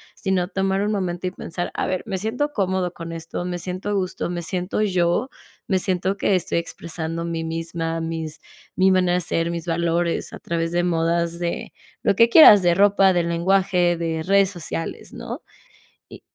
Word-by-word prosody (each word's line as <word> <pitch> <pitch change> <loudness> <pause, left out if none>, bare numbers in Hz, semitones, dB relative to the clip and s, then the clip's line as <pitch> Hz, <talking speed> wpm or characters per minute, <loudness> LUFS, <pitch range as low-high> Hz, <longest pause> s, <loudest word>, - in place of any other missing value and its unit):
sino 185 -2 0
tomar 195 0 0
un 210 +1 0
momento, 185 -3 -2
y - - -3
pensar 175 0 -5
a - - -1
ver: 185 0 -1
"Me 195 - -2
siento 235 +9 -2
cómodo 185 -6 -1
con 165 0 -7
esto, 165 +2 -5
me 175 -1 -3
siento 185 +3 -5
a - - 0
gusto, 185 -3 -2
me 175 -1 -3
siento 180 +4 -2
yo, 185 +4 +1 0.4
me 190 -4 +2
siento 185 +1 -1
que 200 - +1
estoy 175 -1 -1
expresando 165 0 -4
mi 165 -1 -3
misma, 165 0 -3
mis 160 -2 -4 0.4
mi 190 +1 +4
manera 180 -1 +3
de 180 - +1
ser, 165 0 -1
mis 170 0 -5
valores", 170 0 0
a - - -8
través 165 0 -2
de 175 0 +1
modas, 170 0 0
de 170 -1 -4 0.3
lo 200 - +2
que 230 +3 +5
quieras 215 - +9
de 175 -1 +4
ropa, 195 0 +4
del 170 -1 0
lenguaje 175 0 +2
de 165 -1 -2
redes 195 +1 +3
sociales, 165 -3 -6
¿no? - - -7 0.6
Y - - -12
175 Hz, 185 wpm, -22 LUFS, 165-190 Hz, 0.6 s, quieras